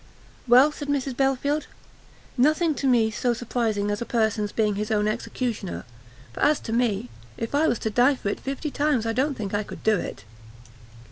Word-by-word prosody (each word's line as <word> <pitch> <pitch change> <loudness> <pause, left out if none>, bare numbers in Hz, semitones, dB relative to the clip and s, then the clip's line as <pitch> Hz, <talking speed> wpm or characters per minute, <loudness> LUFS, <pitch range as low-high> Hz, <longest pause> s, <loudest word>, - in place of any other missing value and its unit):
"Well," 255 +5 +7
said 290 -1 -7
Mrs 275 -2 -1
Belfield, 275 +3 0 0.7
"nothing's 305 +4 +2
to 275 - +1
me 230 -4 +3
so 240 +2 0
surprising 220 -4 -1
as 205 - -3
a - - -2
person's 220 -3 0
being 215 -2 +1
his 210 +2 -3
own 210 -1 +1
executioner, 225 -2 -3 0.5
for - - -9
as 295 0 +3
to 225 - -5
me, 220 - 0 0.3
if 230 - -4
I 305 +3 +3
was 245 - +1
to 220 - 0
die 250 +6 +4
for 205 - -3
it - - -3
fifty 275 +2 -4
times, 285 -6 +1
I 225 - 0
don't 270 +4 0
think 205 -2 -4
I 205 - +1
could 210 - -9
do 220 -1 +3
it." 100 - -6
240 Hz, 195 wpm, -25 LUFS, 215-275 Hz, 0.7 s, Well